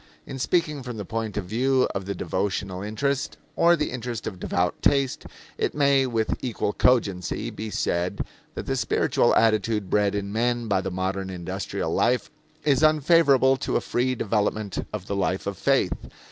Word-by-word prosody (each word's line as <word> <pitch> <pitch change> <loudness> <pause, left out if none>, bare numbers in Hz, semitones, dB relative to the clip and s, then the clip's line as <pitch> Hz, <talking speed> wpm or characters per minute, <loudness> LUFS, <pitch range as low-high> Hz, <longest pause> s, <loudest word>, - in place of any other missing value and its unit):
In 135 - -7
speaking 155 0 0
from 125 -2 -6
the 105 - -5
point 110 0 -3
of 105 - -2
view 130 +6 +2
of 95 - -3
the 100 0 -3
devotional 95 -1 -2
interest, 135 +7 -2 0.2
or 170 +1 +5
the 150 -2 -2
interest 120 -2 -5
of 95 -4 -5
devout 90 0 -1
taste, 140 -2 +1 0.3
it - - 0
may, 140 -2 +3
with 115 -3 -1
equal 115 -4 -1
cogency, 100 -8 +1
be 110 +1 -6
said 90 -3 -1 0.3
that - - -5
the 135 - -1
spiritual 115 -3 +2
attitude 110 -2 +2
bred 105 -1 +2
in 100 0 -3
men 120 +1 0
by 95 -3 +2
the 95 - -3
modern 95 +1 -2
industrial 95 +1 -4
life 125 0 +1 0.3
is 145 -3 +3
unfavorable 150 -4 +5
to - - -2
a - - +4
free 130 +1 0
development 105 -2 -1
of 105 -3 -5
the 100 - -3
life 95 -1 -1
of 100 0 -3
faith. 135 -1 +2
110 Hz, 175 wpm, -25 LUFS, 100-130 Hz, 0.3 s, or